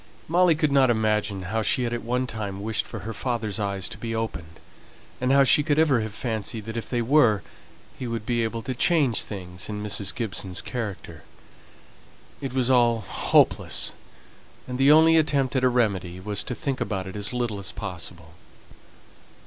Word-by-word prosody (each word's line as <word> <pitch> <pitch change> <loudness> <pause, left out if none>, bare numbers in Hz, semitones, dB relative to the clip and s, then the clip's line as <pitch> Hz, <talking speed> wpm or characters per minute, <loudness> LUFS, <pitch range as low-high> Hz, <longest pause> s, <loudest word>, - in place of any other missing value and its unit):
Molly 175 0 +4
could 150 -1 +1
not 135 -2 +5
imagine 105 -3 0
how 110 +5 -1
she 115 +4 +1
had 120 -1 -2
at 120 - -2
one 125 +2 -1
time 100 -4 -5
wished 110 0 -1
for 110 - -7
her 110 +4 -5
father's 115 -3 -2
eyes 100 -2 -2
to - - -10
be 115 -1 -4
opened, 80 -8 -5 0.6
and 125 +1 +1
how 140 0 +6
she 135 - +5
could 145 -1 0
ever 150 -6 +4
have 110 -1 -5
fancied 110 -2 -3
that 110 0 -6
if 115 - -5
they 120 -2 0
were, 120 -6 +4 0.6
he 125 - -4
would 115 -2 -4
be 120 0 0
able 115 0 -3
to 130 - -3
change 140 -2 +2
things 90 -3 -7
in 105 -1 -4
Mrs. 105 -1 -1
Gibson's 100 -6 -3
character. 110 -6 -5 1.2
It 135 -3 -4
was 130 -1 +2
all 120 -3 +4
hopeless, 95 - +2 0.7
and 125 0 -5
the 135 +2 +6
only 160 +1 +7
attempt 140 -4 +1
at 130 - +1
a 130 - +5
remedy 100 -7 0
was 105 +1 -3
to 125 - -4
think 140 -3 -3
about 95 -3 -2
it 95 - -8
as 105 0 -1
little 120 -4 -2
as 100 - -6
possible. 85 -4 -7
115 Hz, 185 wpm, -25 LUFS, 100-130 Hz, 1.2 s, only